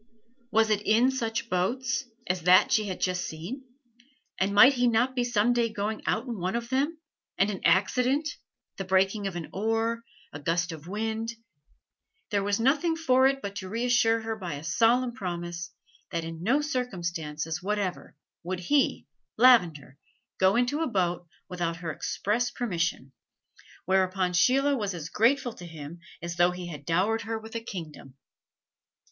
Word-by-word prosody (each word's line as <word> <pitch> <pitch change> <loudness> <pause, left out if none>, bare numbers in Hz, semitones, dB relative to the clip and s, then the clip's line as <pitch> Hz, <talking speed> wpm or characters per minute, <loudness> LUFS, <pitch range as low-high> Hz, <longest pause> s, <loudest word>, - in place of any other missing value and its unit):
Was 220 -1 +3
it 210 -1 +2
in 230 +5 +3
such 230 -3 -2
boats 235 +7 -1 0.2
as 180 -2 -1
that 180 +2 +5
she 215 - +3
had 185 - -4
just 180 -1 0
seen? 180 - -6 0.8
and 195 +1 +1
might 255 +7 +8
he 245 -1 +2
not 240 +3 +2
be 245 - +1
some 240 0 +2
day 235 -1 +1
going 210 +1 -3
out 225 - 0
in 235 -5 -5
one 185 +4 -2
of 235 0 -3
them 280 +5 0 0.4
and 200 +2 +2
an 195 - -6
accident 250 - +2 0.5
the 195 - -3
breaking 190 +2 +1
of 190 - -5
an 170 -3 -5
oar, 225 +3 -1 0.3
a 145 - -6
gust 170 +4 0
of 160 0 -9
wind 220 +3 -3 1.0
There 200 -2 +1
was 205 +1 0
nothing 305 +7 +2
for 265 -5 +4
it 270 0 -1
but 200 0 -5
to 190 -2 -6
reassure 230 0 +2
her 225 0 -3
by 180 -8 -5
a 145 - -8
solemn 235 +8 +2
promise 175 -4 -5 0.4
that 170 -3 -3
in 165 0 -7
no 250 +11 +2
circumstances 170 - -3
whatever 200 -3 -3 0.3
would 180 +1 -4
he, 280 +9 +1 0.3
Lavender, 175 - +4 0.4
go 190 +1 +4
into 245 +6 +1
a 325 - +1
boat 175 -5 -1 0.2
without 175 -2 -2
her 165 -1 -5
express 225 +9 -1
permission, 170 - -2 0.7
whereupon 185 0 +1
Sheila 275 +9 +3
was 205 -6 -2
as 165 -2 -6
grateful 240 +4 +2
to 180 - -11
him 160 0 -9 0.2
as 170 0 -5
though 175 0 +5
he 180 0 -6
had 145 -3 -9
dowered 200 +7 +1
her 225 +1 -3
with 220 0 -11
a 230 - -3
kingdom. 155 - -8
205 Hz, 165 wpm, -27 LUFS, 175-240 Hz, 1.0 s, might